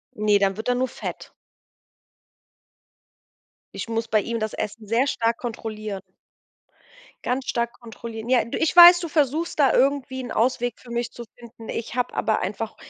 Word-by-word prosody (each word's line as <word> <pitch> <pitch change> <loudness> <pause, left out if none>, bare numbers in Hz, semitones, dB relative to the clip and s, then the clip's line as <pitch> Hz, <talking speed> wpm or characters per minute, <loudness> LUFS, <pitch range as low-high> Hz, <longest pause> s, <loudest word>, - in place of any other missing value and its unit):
Ne, 210 -1 +3
dann 195 0 +1
wird 220 - -5
er 245 - +2
nur 255 +1 0
fett. - - -8 2.4
Ich - - -5
muss 225 0 -2
bei 215 -2 +2
ihm 230 +1 -3
das 215 0 -3
Essen 215 +1 -5
sehr 240 +6 +2
stark 230 -3 0
kontrollieren. 215 -4 -5 1.2
Ganz 255 +2 -1
stark 235 0 -1
kontrollieren. 230 -1 -8
Ja, 255 -2 +4
du, 230 - -5
ich 320 - 0
weiß, 350 0 +10
du 340 - -4
versuchst 305 +2 0
da 280 -3 +4
irgendwie 265 -1 +1
'n 245 - -7
Ausweg 245 +1 0
für 240 - -14
mich 235 -1 -2
zu 240 - -8 0.2
finden. 230 -1 -12
Ich 235 +1 -5
habe 250 0 -1
aber 220 - 0
einfach 210 +4 -4
235 Hz, 170 wpm, -24 LUFS, 220-260 Hz, 2.4 s, weiß